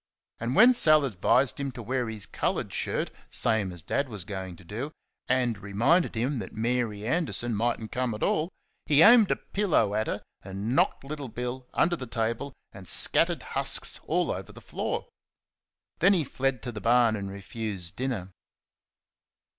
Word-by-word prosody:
And 115 +3 -2
when 245 +4 +8
Sal 155 - +5
advised 125 +5 +2
him 140 -1 -2
to 120 - -8
wear 125 0 -1
his 110 -3 -3
coloured 85 - -2
shirt, - - -2 0.2
same 105 -4 +1
as 90 -3 -8
Dad 140 - -1
was 105 -5 -5
going 95 -2 -6
to 90 - -16
do, 115 - -5 0.4
and 125 -4 +1
reminded 115 - +2
him 125 +4 -1
that 95 - -8
Mary 115 -2 -1
Anderson 125 -4 0
might 115 +3 0
n't 110 -1 -8
come 125 -3 -1
at 105 - -5
all, 155 +3 +1 0.4
he 150 +1 +6
aimed 230 -2 +8
a - - +2
pillow 190 - 0
at 110 +1 0
her - - -3 0.2
and 100 +6 -4
knocked - - +2
Little 145 0 -6
Bill 125 +2 -5
under 175 +1 +2
the 130 -6 -7
table, 115 +4 -2 0.2
and 95 -2 -11
scattered - - +3
husks - - +1
all - - +1
over - - -5
the - - -12
floor. - - -4 0.9
Then 195 +4 +5
he 175 -5 +2
fled 135 -2 -2
to 125 - -4
the 105 -2 -7
barn 115 -1 +4
and 100 -2 -5
refused 100 -2 -4
dinner. 120 -8 -3
120 Hz, 175 wpm, -27 LUFS, 105-135 Hz, 0.9 s, when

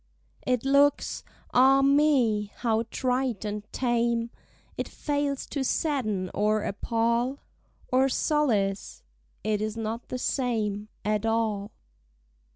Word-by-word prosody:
It 250 0 +1
looks, 280 +1 +3 0.3
ah 270 +2 +6
me! 275 -7 +3
how 225 -1 0
trite 250 -5 -1
and 210 0 -5
tame! 235 -1 0 0.4
It - - -3
fails 285 -2 -2
to 280 - -2
sadden 215 - -1
or 210 +1 +1
appal 235 +5 0 0.5
Or 260 +1 +4
solace—it 215 -5 -1
is 215 +1 -3
not 225 +1 -4
the 255 - -3
same 220 -6 -1 0.2
At 215 +1 0
all. 220 -3 0
235 Hz, 105 wpm, -27 LUFS, 215-265 Hz, 0.5 s, ah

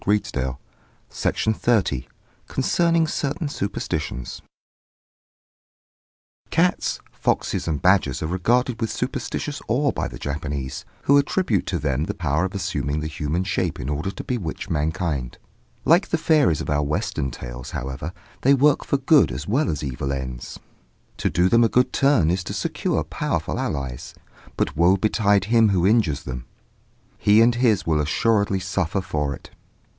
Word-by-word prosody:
CONCERNING 65 -11 0 0.5
CERTAIN 110 - 0
SUPERSTITIONS 100 - +1 0.4
CONCERNING 165 +4 +2
CERTAIN 155 +1 -2
SUPERSTITIONS 85 - -4 2.1
Cats, 175 +2 +1
foxes, - - -1
and 75 -4 -2
badgers 90 -9 +3
are - - -1
regarded 120 +7 +1
with 115 - 0
superstitious - - -3
awe - - +2
by - - -2
the - - -9
Japanese, 70 -1 -4 0.2
who 140 +1 +5
attribute 140 - 0
to 90 - -1
them 70 -1 -1
the - - -4
power 80 +1 0
of 95 - -5
assuming 75 -6 -2
the - - -4
human 80 +2 -2
shape 95 -3 -1
in 65 - -4
order 75 +5 -2
to 95 - -7
bewitch 100 -11 -4
mankind. 75 -4 -1 0.5
Like 170 +5 +5
the 165 - 0
fairies 155 - +3
of - - -5
our 75 0 +2
Western 70 -2 -1
tales, - - -8
however, 70 +5 -5 0.3
they 140 +2 +5
work 145 +2 +3
for 140 - 0
good 135 - +4
as 65 +4 -5
well 135 +9 +1
as 75 - -2
for - - -4
evil 70 +1 -3
ends. 65 -3 -5 0.6
To - - 0
do 90 +3 +2
them 115 +4 +5
a 115 - +4
good 125 0 +2
turn 135 - +3
is 90 +1 -1
to - - -4
secure - - -1
powerful - - -2
allies; 65 -5 -4 0.4
but - - 0
woe 85 +4 +4
betide 100 -1 +2
him 110 0 +4
who 90 -3 +2
injures 95 -10 +2
them! 65 -2 -6 0.7
he 105 +1 +5
and 115 +1 +5
his 115 -5 +2
will 80 -2 +2
assuredly 100 +5 +1
suffer 95 0 -1
for 75 -5 -2
it. - - -15
90 Hz, 155 wpm, -23 LUFS, 75-115 Hz, 2.1 s, who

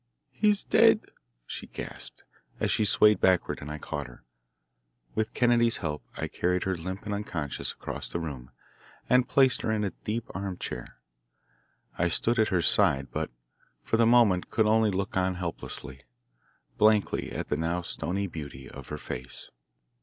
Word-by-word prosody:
"He 210 - +2
is 205 -1 +1
dead!" 225 -1 +5 0.4
she - - -6
gasped - - -6 0.4
as - - +1
she 110 - +2
swayed 105 -1 +5
backward 95 -2 +3
and 75 - -7
I 75 - -4
caught 75 -1 -5
her. - - -15 0.9
With 110 0 -2
Kennedy's 120 -1 +4
help 75 -2 -4
I - - -2
carried 90 0 0
her, 95 0 0
limp 95 +3 -6
and 105 - -2
unconscious, 85 - -3
across - - -5
the 85 - -3
room, 70 -6 -6 0.6
and 125 0 +4
placed 135 -2 +4
her 110 - 0
in 110 -1 0
a 100 - -1
deep 110 +2 -4
armchair. 95 -1 -5 1.0
I 90 - +3
stood 115 +7 +1
at 110 - +4
her 90 -4 +1
side, 70 -3 +3
but - - -2 0.5
for 115 - +1
the 115 0 +5
moment 115 -7 +4
could 110 - +2
only 110 0 +4
look 100 0 -2
on 95 0 +1
helplessly, 75 -6 -5 0.8
blankly 105 -1 +3
at - - -4
the - - 0
now 85 +2 -1
stony 95 +4 -2
beauty 70 -7 -7
of 70 0 -10
her 75 - -5
face. 60 -3 -5
95 Hz, 165 wpm, -28 LUFS, 80-110 Hz, 1.0 s, dead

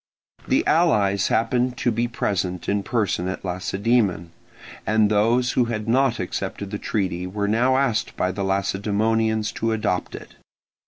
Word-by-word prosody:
The 270 +5 +2
allies 105 - +3
happened 125 +2 +1
to 120 - +1
be 115 +2 0
present 90 -6 -2
in 100 0 +1
person 100 -5 -1
at 95 +1 -5
Lacedaemon, 95 -1 0 0.5
and 105 0 +2
those 115 +4 +2
who 125 - +2
had 110 -2 -4
not 130 +1 +2
accepted 95 +2 -4
the 105 - -4
treaty 90 -4 -2
were 100 +2 -2
now 125 +5 +2
asked 135 -5 0
by 90 - 0
the 100 +1 -4
Lacedaemonians 105 +3 0
to 115 0 -1
adopt 105 -5 -2
it. - - -12
105 Hz, 150 wpm, -23 LUFS, 95-120 Hz, 0.5 s, allies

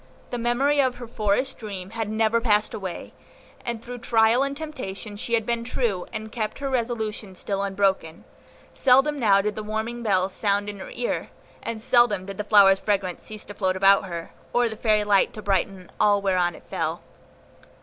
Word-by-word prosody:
The 245 - -2
memory 270 +5 +2
of 260 -2 +1
her 245 - -8
forest 225 +4 -1
dream 195 -4 -7
had 225 -2 -3
never 220 +1 +2
passed 210 -2 +2
away, 190 -4 -6 0.5
and 235 -1 -4
through 245 0 -7
trial 230 +1 +3
and 275 0 -1
temptation 230 -10 -6
she 235 +3 -1
had 225 -2 0
been 235 0 -1
true, 235 -6 -2
and 220 0 -6
kept 220 -3 -3
her 275 -1 -3
resolution 220 -5 -2
still 195 +2 -3
unbroken; 195 -4 0 0.5
seldom 270 +3 +4
now 200 -5 +4
did 210 +1 -1
the 215 - -4
warning 220 +3 -3
bell 190 -5 +2
sound 205 +1 0
in 205 -1 -7
her 190 - -8
ear, 245 - -3 0.3
and 225 -1 -5
seldom 235 -7 +3
did 195 0 -8
the - - 0
flower's 200 -2 +6
fragrance 195 -4 -1
cease 215 -1 -8
to 205 - -9
float 190 -2 0
about 195 +1 +5
her, 170 -2 -6 0.2
or 240 0 +3
the 220 - -6
fairy 215 -1 +2
light 205 -2 +3
to 215 - -7
brighten 190 -1 -1
all 205 -1 +4
whereon 180 -3 +1
it - - -14
fell. - - -3
215 Hz, 190 wpm, -24 LUFS, 195-235 Hz, 0.5 s, flower's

